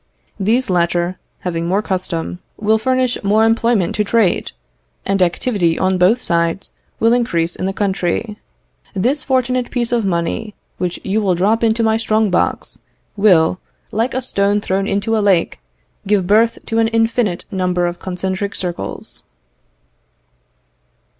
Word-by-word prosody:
These 220 +3 +1
latter, 175 +1 0 0.2
having 170 -2 -2
more 195 +4 +1
custom, 180 -3 -3 0.2
will 220 +1 +2
furnish 255 +1 0
more 215 +3 +3
employment 225 -4 +2
to 210 - +2
trade, 210 -3 +1 0.5
and 195 0 0
activity 175 -1 +1
on 185 -1 +1
both 195 +7 +4
sides 170 -3 -1 0.3
will 225 +1 +4
increase 170 -9 0
in 185 - -3
the - - 0
country. 200 +2 -1 0.6
This 250 +10 0
fortunate 255 -2 0
piece 240 -2 -1
of 235 -2 +1
money, 190 +3 -2 0.2
which 180 -1 -2
you 205 +3 0
will 190 -3 +1
drop 210 +6 +1
into 225 0 +2
my 220 0 +3
strong 220 -2 +1
box, 180 - -1 0.4
will, 185 -4 +4 0.3
like 230 +4 -1
a 260 - 0
stone 200 -3 +1
thrown 195 -1 -1
into 205 +3 0
a 215 - +2
lake, 195 -4 +2 0.5
give 200 -2 +2
birth 225 +4 +3
to 225 -1 -1
an 225 - +3
infinite 225 -4 0
number 180 -2 0
of 175 0 -3
concentric 190 +2 -3
circles." 175 - -5
200 Hz, 145 wpm, -18 LUFS, 180-225 Hz, 0.6 s, both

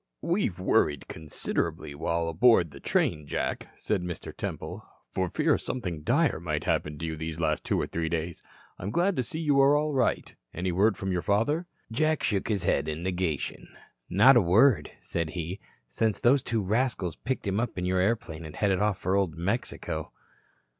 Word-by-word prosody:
"We've 170 - 0
worried 75 -6 +2
considerably 75 -2 -3
while 85 +3 -1
aboard 85 -1 +4
the 70 - -11
train, 75 +2 0
Jack," - - -2
said 105 -4 -1
Mr. 90 -1 -6
Temple, - - -5 0.3
"for - - -1
fear - - +2
something 90 -11 -4
dire 140 - +2
might 75 -2 -2
happen 80 -3 -1
to 80 - -4
you 80 -1 -3
these 80 +1 -5
last 75 -2 0
two - - 0
or - - 0
three 80 -1 -2
days. 85 0 -3 0.4
I'm 95 - -4
glad 175 - +2
to 130 - +1
see 140 - -6
you 145 -4 +3
are 140 +2 +6
all 150 0 0
right. 130 -3 0 0.2
Any 90 +1 -1
word 100 +3 +3
from 95 0 -2
your 90 -1 0
father?" 115 - +1 0.2
Jack 155 +6 +1
shook 100 -3 0
his 105 -5 0
head 70 - +1
in 80 +2 -3
negation. 90 -5 -2 0.4
"Not 105 +9 +7
a 120 - +7
word," 105 +8 +4
said 85 -2 -2
he, 85 +3 -4 0.3
"since 105 - 0
those 130 +3 +4
two 115 -3 -1
rascals 105 -5 0
picked 130 -1 -3
him 100 +1 0
up 120 -3 -2
in 90 - -1
your 90 0 +1
airplane 90 -5 -1
and 80 -1 -9
headed 95 -3 +1 0.2
for 95 +2 0
Old 95 -5 +1
Mexico." 100 +8 -2
95 Hz, 185 wpm, -28 LUFS, 80-120 Hz, 0.4 s, Not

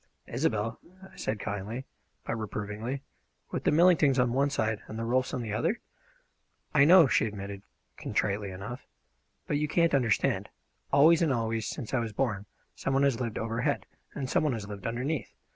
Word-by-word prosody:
"Isobel!" 115 -4 -1 0.2
I 190 - -14
said 105 0 -3
kindly 105 +6 -4 0.4
but - - -2
reprovingly. 110 +4 -4 0.5
"With - - -3
the - - +4
Millingtons 160 -4 +5
on 125 -2 +2
one 140 +2 +2
side 110 -5 -1
and 110 - -7
the 115 - -2
Rolfs 130 +2 +1
on 125 -3 -3
the 110 -2 -4
other?" 165 - 0 0.9
"I 140 -2 +6
know," 175 +1 +8
she 125 - +3
admitted 100 -1 -6 0.4
contritely 100 0 -1
enough; 100 +7 -7 0.6
"but 145 - 0
you 150 +1 0
can't 170 +1 +2
understand. 120 -6 +2 0.4
Always 160 +4 +6
and 160 -4 +3
always, 115 -3 -1
since 125 -8 -5
I 130 - +3
was 115 -2 -3
born, 105 -5 -1 0.3
some 135 - -2
one 135 - +3
has 135 -4 +2
lived 115 -3 -2
overhead, 115 +6 -1 0.3
and 135 -3 -3
some - - +2
one 150 -4 +1
has 105 -3 -5
lived 100 -1 -6
underneath. 125 +3 -3
120 Hz, 175 wpm, -29 LUFS, 110-140 Hz, 0.9 s, know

